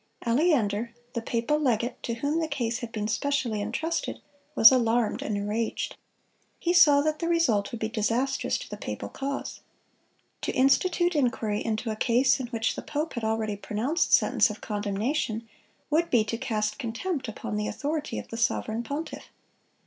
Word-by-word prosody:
Aleander, 235 Hz, -, +2 dB, 0.2 s
the 235 Hz, -, -2 dB
papal 235 Hz, +6 st, 0 dB
legate 240 Hz, -4 st, 0 dB
to 235 Hz, -, -3 dB
whom 285 Hz, +7 st, 0 dB
the 320 Hz, -, 0 dB
case 240 Hz, -5 st, -2 dB
had 235 Hz, -2 st, -6 dB
been 210 Hz, -1 st, -2 dB
specially 230 Hz, -1 st, 0 dB
intrusted, 310 Hz, +11 st, -2 dB, 0.4 s
was 225 Hz, -2 st, +10 dB
alarmed 235 Hz, -3 st, +2 dB
and 210 Hz, -, -2 dB
enraged. 210 Hz, +3 st, -2 dB, 0.6 s
He 345 Hz, -, 0 dB
saw 295 Hz, -5 st, +7 dB
that 305 Hz, +1 st, 0 dB
the 335 Hz, -, -1 dB
result 255 Hz, -13 st, +2 dB
would 235 Hz, -, -5 dB
be 220 Hz, -, +1 dB
disastrous 235 Hz, +5 st, 0 dB
to -, -, -9 dB
the -, -, -5 dB
papal -, -, -5 dB
cause. 275 Hz, 0 st, -4 dB, 0.8 s
To -, -, -1 dB
institute 345 Hz, +6 st, +3 dB
inquiry 235 Hz, -6 st, 0 dB
into 225 Hz, 0 st, -2 dB
a -, -, -3 dB
case 250 Hz, +4 st, +3 dB
in 255 Hz, -, -3 dB
which 225 Hz, -2 st, -1 dB
the -, -, -5 dB
pope 305 Hz, +2 st, -3 dB
had 235 Hz, -, -4 dB
already 220 Hz, -1 st, 0 dB
pronounced 220 Hz, -, -1 dB
sentence -, -, +4 dB
of 210 Hz, -, -7 dB
condemnation, 215 Hz, +3 st, -2 dB, 0.4 s
would 335 Hz, +3 st, +2 dB
be 235 Hz, -3 st, +4 dB
to 220 Hz, +2 st, -3 dB
cast 215 Hz, -4 st, -1 dB
contempt 265 Hz, +5 st, -3 dB
upon 220 Hz, 0 st, -5 dB
the 210 Hz, 0 st, -1 dB
authority 300 Hz, +1 st, -3 dB
of -, -, -6 dB
the 230 Hz, -, -6 dB
sovereign 230 Hz, -1 st, 0 dB
pontiff. 285 Hz, +7 st, -5 dB
235 Hz, 170 wpm, -27 LUFS, 220-285 Hz, 0.8 s, was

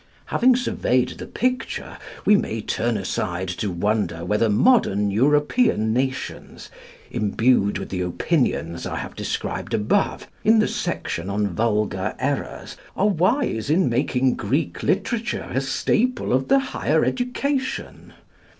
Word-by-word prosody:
Having 255 Hz, 0 st, +5 dB
surveyed 130 Hz, -, +1 dB
the -, -, -8 dB
picture, 255 Hz, +1 st, -2 dB, 0.3 s
we 210 Hz, -, +6 dB
may 115 Hz, -, -1 dB
turn 115 Hz, +1 st, -1 dB
aside 95 Hz, -2 st, -2 dB
to 100 Hz, +3 st, -2 dB
wonder 90 Hz, -2 st, -1 dB
whether 105 Hz, +4 st, +2 dB
modern 105 Hz, -, +3 dB
European 145 Hz, -, +2 dB
nations, 130 Hz, +2 st, -3 dB, 0.4 s
imbued 105 Hz, 0 st, +2 dB
with -, -, -6 dB
the 90 Hz, -1 st, -3 dB
opinions 90 Hz, -, -1 dB
I -, -, -4 dB
have -, -, -6 dB
described -, -, -3 dB
above 110 Hz, -, 0 dB, 0.2 s
in 220 Hz, +2 st, +5 dB
the 215 Hz, -, +3 dB
section 85 Hz, +4 st, -3 dB
on 100 Hz, +1 st, 0 dB
Vulgar 105 Hz, +2 st, -1 dB
Errors, -, -, -3 dB, 0.2 s
are 205 Hz, +2 st, +2 dB
wise 185 Hz, -, +1 dB
in 165 Hz, 0 st, +3 dB
making 125 Hz, +1 st, +1 dB
Greek -, -, -1 dB
literature 235 Hz, -1 st, -1 dB
a 135 Hz, -, +1 dB
staple 225 Hz, -, 0 dB
of 130 Hz, +1 st, +1 dB
the 275 Hz, -, +5 dB
higher 270 Hz, -1 st, +1 dB
education. 260 Hz, +2 st, -2 dB
125 Hz, 130 wpm, -23 LUFS, -, 0.4 s, we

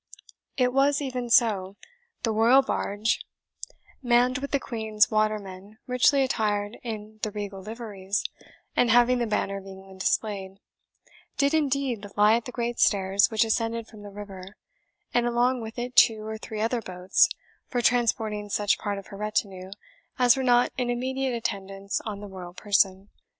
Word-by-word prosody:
It 250 Hz, -1 st, +2 dB
was 275 Hz, +1 st, +3 dB
even 255 Hz, -4 st, -4 dB
so. 200 Hz, -5 st, +3 dB, 0.5 s
The 225 Hz, -, +1 dB
royal 235 Hz, +5 st, +5 dB
barge, 215 Hz, -3 st, -1 dB, 0.8 s
manned 250 Hz, 0 st, +3 dB
with 280 Hz, +1 st, -5 dB
the 280 Hz, -, +1 dB
Queen's 220 Hz, -4 st, 0 dB
watermen 210 Hz, -2 st, -2 dB
richly 255 Hz, +2 st, +3 dB
attired 210 Hz, -4 st, -1 dB
in 215 Hz, -2 st, -7 dB
the 215 Hz, -, -1 dB
regal 205 Hz, -2 st, -6 dB
liveries, 205 Hz, -2 st, -4 dB, 0.5 s
and 245 Hz, -, +3 dB
having 245 Hz, +2 st, +4 dB
the 235 Hz, -, 0 dB
Banner 200 Hz, -2 st, -1 dB
of 195 Hz, 0 st, -10 dB
England 190 Hz, 0 st, -12 dB
displayed, 195 Hz, -1 st, -1 dB, 0.8 s
did 280 Hz, +1 st, +2 dB
indeed 275 Hz, -8 st, 0 dB
lie 210 Hz, +1 st, +6 dB
at 235 Hz, -, -2 dB
the 250 Hz, -, -6 dB
great 240 Hz, -1 st, -3 dB
stairs 195 Hz, -1 st, +3 dB
which 220 Hz, 0 st, +2 dB
ascended 230 Hz, +1 st, -1 dB
from 215 Hz, -2 st, -14 dB
the 205 Hz, -, -9 dB
river, 195 Hz, -1 st, -10 dB, 0.6 s
and 240 Hz, 0 st, +2 dB
along 240 Hz, +1 st, +1 dB
with 225 Hz, +1 st, -8 dB
it 245 Hz, +1 st, -4 dB
two 220 Hz, -2 st, +5 dB
or 220 Hz, 0 st, -5 dB
three 215 Hz, 0 st, -6 dB
other 230 Hz, +2 st, 0 dB
boats 185 Hz, -1 st, +2 dB, 0.4 s
for 245 Hz, -2 st, -2 dB
transporting 220 Hz, -3 st, +1 dB
such 205 Hz, 0 st, +1 dB
part 205 Hz, -1 st, -3 dB
of 195 Hz, -, -8 dB
her 200 Hz, -, -9 dB
retinue 195 Hz, -3 st, -2 dB, 0.5 s
as 245 Hz, -2 st, +5 dB
were 265 Hz, -, -2 dB
not 245 Hz, -1 st, +3 dB
in 245 Hz, -1 st, -1 dB
immediate 260 Hz, +1 st, -1 dB
attendance 195 Hz, -3 st, -4 dB
on 210 Hz, -2 st, -5 dB
the 205 Hz, -, -7 dB
royal 180 Hz, -2 st, -9 dB
person. 195 Hz, -1 st, +1 dB
220 Hz, 160 wpm, -26 LUFS, 200-245 Hz, 0.8 s, lie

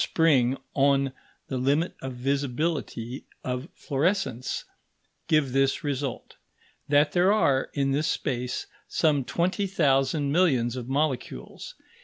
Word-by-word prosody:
Spring 135 Hz, -6 st, +3 dB, 0.2 s
on 140 Hz, -1 st, +2 dB, 0.3 s
the 130 Hz, -, -3 dB
limit 145 Hz, +7 st, +1 dB
of 135 Hz, -, -4 dB
visibility 135 Hz, -1 st, -2 dB, 0.2 s
of 125 Hz, +4 st, -3 dB
fluorescence), 145 Hz, -, -1 dB, 0.6 s
give 155 Hz, -5 st, +2 dB
this 135 Hz, +3 st, +2 dB
result: 140 Hz, -3 st, -4 dB, 0.5 s
that 145 Hz, +1 st, +4 dB
there 180 Hz, +3 st, +4 dB
are, 140 Hz, -11 st, +2 dB
in 135 Hz, -1 st, +1 dB
this 150 Hz, +3 st, +1 dB
space, 125 Hz, -3 st, -2 dB, 0.2 s
some 150 Hz, -4 st, +2 dB
twenty 185 Hz, +8 st, 0 dB
thousand 140 Hz, -4 st, +2 dB
millions 135 Hz, -8 st, +2 dB
of 125 Hz, -1 st, -6 dB
molecules. 140 Hz, -1 st, -3 dB
140 Hz, 115 wpm, -26 LUFS, 130-155 Hz, 0.6 s, that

